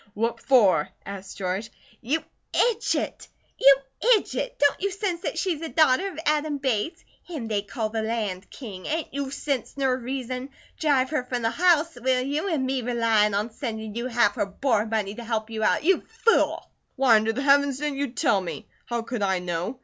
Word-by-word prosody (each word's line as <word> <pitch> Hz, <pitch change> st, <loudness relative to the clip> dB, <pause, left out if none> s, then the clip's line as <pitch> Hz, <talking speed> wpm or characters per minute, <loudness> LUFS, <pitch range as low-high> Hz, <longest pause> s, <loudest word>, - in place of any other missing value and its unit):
What 230 Hz, +2 st, -1 dB
for?" 205 Hz, -, +4 dB, 0.2 s
asked 195 Hz, -1 st, -8 dB
George. 195 Hz, +3 st, -2 dB, 0.3 s
"You 290 Hz, +7 st, -1 dB, 0.3 s
idjit! 465 Hz, -1 st, 0 dB, 0.3 s
You 275 Hz, 0 st, +8 dB, 0.4 s
idjit! -, -, -4 dB
Don't 285 Hz, 0 st, +2 dB
you 400 Hz, -, +1 dB
sense 380 Hz, -3 st, -3 dB
that -, -, -3 dB
she's 345 Hz, -5 st, -1 dB
a 325 Hz, -, -4 dB
daughter 310 Hz, +2 st, +3 dB
of -, -, -12 dB
Adam 300 Hz, 0 st, +1 dB
Bates? 265 Hz, -, -2 dB, 0.2 s
Him 305 Hz, -10 st, -6 dB
they 210 Hz, -2 st, 0 dB
call 215 Hz, +2 st, -3 dB
the 220 Hz, 0 st, -2 dB
Land 215 Hz, -4 st, -3 dB
King. 200 Hz, -8 st, -8 dB
Ain't 320 Hz, 0 st, -2 dB
you 280 Hz, -1 st, -2 dB
sense 275 Hz, -2 st, -3 dB
ner 265 Hz, -2 st, +2 dB
reason? 255 Hz, +1 st, -4 dB, 0.3 s
Drive 275 Hz, -4 st, +2 dB
her 300 Hz, -5 st, 0 dB
from 245 Hz, -2 st, -3 dB
the 225 Hz, -, +2 dB
house, 335 Hz, -4 st, +2 dB
will 255 Hz, 0 st, +2 dB
you? 295 Hz, +8 st, -1 dB
An' 300 Hz, -6 st, 0 dB
me 260 Hz, 0 st, -1 dB
relyin' 225 Hz, -4 st, +2 dB
on 210 Hz, +3 st, -1 dB
sendin' 220 Hz, -3 st, -5 dB
you 235 Hz, +3 st, -3 dB
half 235 Hz, -4 st, +3 dB
her 205 Hz, -, 0 dB
board 220 Hz, +1 st, 0 dB
money 210 Hz, -3 st, -1 dB
to 235 Hz, -, -8 dB
help 225 Hz, -1 st, -2 dB
you 220 Hz, -1 st, -4 dB
out? -, -, +2 dB
You 370 Hz, +2 st, +3 dB, 0.2 s
fool!" 460 Hz, -, +3 dB, 0.2 s
"Why 260 Hz, -4 st, +5 dB
under 220 Hz, +1 st, +1 dB
the 260 Hz, +5 st, -3 dB
Heavens 280 Hz, -1 st, +4 dB
didn't 290 Hz, -1 st, -3 dB
you 285 Hz, -, 0 dB
tell 205 Hz, -5 st, +1 dB
me? 185 Hz, +4 st, -6 dB, 0.2 s
How 235 Hz, -1 st, -2 dB
could 235 Hz, -1 st, -4 dB
I 190 Hz, -2 st, +2 dB
know? 180 Hz, +7 st, -3 dB
250 Hz, 195 wpm, -25 LUFS, 220-285 Hz, 0.4 s, You